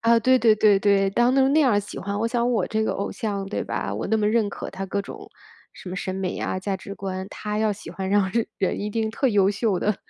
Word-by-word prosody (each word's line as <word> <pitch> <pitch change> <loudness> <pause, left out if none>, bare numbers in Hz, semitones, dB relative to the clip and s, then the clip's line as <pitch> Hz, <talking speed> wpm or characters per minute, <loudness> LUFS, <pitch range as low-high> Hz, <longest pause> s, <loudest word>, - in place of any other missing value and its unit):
啊， 230 +1 +4
对 255 +3 +4
对 225 -3 +5
对 210 -2 +4
对， 195 -1 +3
当 240 +5 +3
成 270 0 +4
那 305 - +4
样 270 -6 +4
儿 205 - +3
喜 205 - -8
欢， 200 +1 -4
我 230 - +1
想 240 0 0
我 240 - +1
这 220 0 0
个 - - 0
偶 200 - -3
像 200 -3 -3
对 195 - -3
吧？ 100 - -3
我 105 +3 -3
那 220 - +2
么 210 -1 +1
认 220 -1 +2
可 - - -7
她 195 - -5
各 200 +1 -2
种， - - -10 0.4
什 - - -11
么 185 - -5
审 185 0 -3
美 190 -1 -3
呀， - - -2
价 195 0 -2
值 200 +1 -9
观， 190 -1 -5
她 210 0 -4
要 215 -1 +2
喜 205 - -9
欢 190 -1 -4
让 195 -1 +2 0.3
人 190 - 0
一 210 - -3
定 220 0 -1
特 245 +5 0
优 200 -5 +3
秀 205 -2 0
的。 210 -2 +1
205 Hz, 290 characters per minute, -24 LUFS, 195-225 Hz, 0.4 s, 对